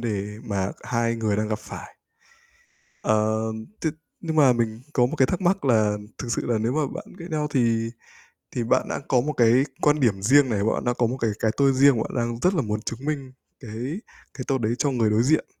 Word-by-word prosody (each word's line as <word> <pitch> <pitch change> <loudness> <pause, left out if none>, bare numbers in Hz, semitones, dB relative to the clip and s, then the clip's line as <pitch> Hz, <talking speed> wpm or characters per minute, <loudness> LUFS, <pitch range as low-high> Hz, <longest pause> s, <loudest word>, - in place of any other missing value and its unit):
đề 105 -2 -3
mà 100 -2 -2
c - - -18
hai 115 -1 0
người 110 -3 0
đang 105 0 -1
gặp 110 0 -1
phải. - - -10 1.1
Ờ, 110 0 +2 0.4
th - - -3 0.3
nhưng 160 -2 -3
mà 140 -4 +6
mình 115 -1 -1
có 125 -4 +3
một 150 +6 -4
cái 130 - +4
thắc 180 - -2
mắc 190 0 +1
là 110 -5 +3 0.2
thực 125 - -5
sự - - -2
là 120 -2 +1
nếu 115 +3 0
mà 150 -1 +1
bạn - - -6
ghét 170 - -8
nhau 150 -1 -1
thì 115 -4 +1 0.6
thì 120 - -2
bạn 115 - +1
đã - - -2
có 125 -2 +3
một 150 +4 -2
cái 120 +1 +4 0.2
quan 150 0 +3
điểm 105 -7 +2
riêng 135 +5 +5
này, 100 -3 0
bạn 110 - 0
đã 120 - +2
có 120 -1 +1
một 125 +3 -3
cái 115 -4 0
cái 110 - +2
tôi 140 -1 +4
riêng 135 -1 +5
mà - - 0
bạn - - -7
đang 120 -1 -1
rất 180 +8 +2
là 160 - +1
muốn 105 -2 -2
chứng 120 +5 -6
minh 140 -4 -3 0.3
cái 125 - -5 0.3
cái 130 - -6
tôi 135 -1 +1
đấy 115 +2 0
cho 145 - +1
người 115 -4 +2
đối 105 +2 +3
diện 155 +5 +2
120 Hz, 240 wpm, -24 LUFS, 110-140 Hz, 1.1 s, mà